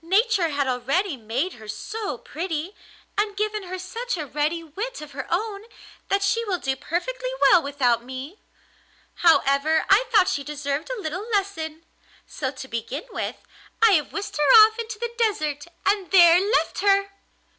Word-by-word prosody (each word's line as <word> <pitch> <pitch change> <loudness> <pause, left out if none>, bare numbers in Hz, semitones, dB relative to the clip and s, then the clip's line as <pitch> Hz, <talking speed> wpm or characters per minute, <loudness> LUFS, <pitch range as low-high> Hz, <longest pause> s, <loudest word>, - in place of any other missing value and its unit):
Nature 390 0 +2
had 285 -2 -1
already 275 +8 0
made 255 +10 -3
her 220 -2 -13
so 300 - -5
pretty, 330 - -5 0.5
and 415 -1 -1
given 425 0 -1
her 370 -1 -6
such 455 +4 -4
a 310 - -4
ready 300 +4 -1
wit 415 +11 -6
of 300 -1 -10
her 265 -1 -6
own, 400 +3 -2 0.5
that 395 0 +1
she 455 +4 +1
will 385 -4 -1
do 270 -5 -2
perfectly - - -3
well 360 - +6
without 260 -5 +1
me. 260 - -8 0.8
However, 315 -2 +3
I 420 +6 +6
thought 405 -5 +5
she 280 - -1
deserved 290 - -4
a - - -4
little 370 +5 -5
lesson, 330 -7 -2 0.4
so 265 - -4
to 265 0 -9
begin 240 +6 -4
with - - -3 0.4
I 455 -1 +6
have 315 -6 +2
whisked 405 -5 -5
her 295 +9 +8
off 440 +1 -4
into 455 -1 -5
the 475 +1 -4
desert, 305 -10 0 0.2
and 395 -2 +1
there 345 -2 +7
left 410 +5 0
her! 395 0 +3
345 Hz, 165 wpm, -24 LUFS, 285-410 Hz, 0.8 s, her